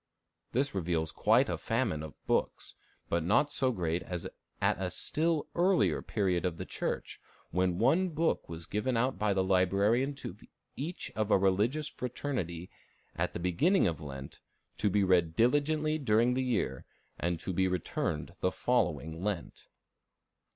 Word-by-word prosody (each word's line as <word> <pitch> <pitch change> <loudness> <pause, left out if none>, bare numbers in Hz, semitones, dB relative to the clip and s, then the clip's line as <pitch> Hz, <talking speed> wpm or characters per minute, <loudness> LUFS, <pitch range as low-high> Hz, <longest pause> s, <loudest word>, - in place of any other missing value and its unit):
This 135 +3 0
reveals 85 -4 -1
quite 115 +6 +3
a - - -2
famine 115 -10 0
of 80 -1 -8
books, - - -1 0.3
but 85 -1 0
not 110 - +3
so 130 -1 +2
great 85 -5 -1
as 90 -2 -5 0.3
at - - +1
a 90 - -1
still 155 - 0
earlier 180 +1 +3
period 95 -5 0
of 90 -3 -1
the - - -5
Church, - - -4 0.3
when 90 0 +1
one 185 - +3
book 165 0 0
was 80 0 -6
given 115 +6 -1
out 130 +3 0
by 105 -1 +2
the 95 -1 +2
librarian 100 +8 +2
to 140 - -7 0.4
each 165 +6 -4
of 110 -1 0
a - - +6
religious 105 +11 +1
fraternity 115 - -4 0.4
at - - -1
the - - -4
beginning 140 - +3
of 85 -4 -1
Lent, 70 -2 -8 0.4
to 105 - +2
be 100 +1 +2
read 85 -4 +3
diligently 150 - +2
during 120 -2 +3
the 130 - 0
year, 105 - -1 0.4
and 85 -1 -1
to 95 - -4
be 95 +1 +2
returned 85 -3 -2
the - - +1
following 80 +5 0
Lent. 100 -5 -4
100 Hz, 160 wpm, -31 LUFS, 85-130 Hz, 0.4 s, a